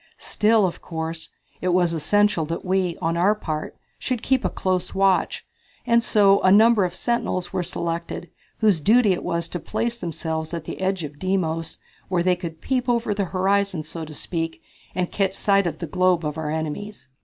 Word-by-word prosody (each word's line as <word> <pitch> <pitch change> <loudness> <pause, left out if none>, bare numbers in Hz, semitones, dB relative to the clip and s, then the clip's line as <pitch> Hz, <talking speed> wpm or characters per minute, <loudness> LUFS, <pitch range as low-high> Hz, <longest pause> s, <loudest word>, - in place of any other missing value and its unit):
Still, 215 -1 +2
of 175 - -3
course, 160 -1 -5 0.3
it 185 - -1
was 175 -1 +3
essential 205 +3 +2
that 165 +4 -4
we, 185 -2 0
on 165 +1 +1
our 195 +5 +4
part, 155 -7 -5 0.2
should 250 -3 -2
keep 265 -1 +2
a - - +1
close 185 -1 -2
watch, 195 -1 +2 0.4
and 235 -1 +4
so 200 -4 +4
a 185 - +4
number 220 0 +6
of 180 - -4
sentinels 215 -7 -1
were 185 - 0
selected, 170 0 -4 0.3
whose 210 -6 +4
duty 215 +4 +4
it 175 - -4
was 170 0 -1
to 175 - -4
place 235 +7 -2
themselves 160 -1 -3
at 165 - -5
the 160 - -7
edge 190 -2 0
of 145 -1 -8
Deimos, 165 -4 -1 0.3
where 180 -2 +1
they 180 0 +3
could 170 -3 -7
peep 255 -1 -1
over 235 -3 +1
the 200 -1 -1
horizon, 190 -1 +1
so 165 +1 -7
to 155 0 -8
speak, 165 0 -4 0.3
and 180 -1 -1
catch 195 -2 0
sight 200 -1 +2
of 160 -2 -3
the 170 - -4
globe 180 +1 +2
of 150 -1 -2
our 160 -2 -3
enemies. 160 +2 -4
185 Hz, 190 wpm, -23 LUFS, 165-200 Hz, 0.4 s, number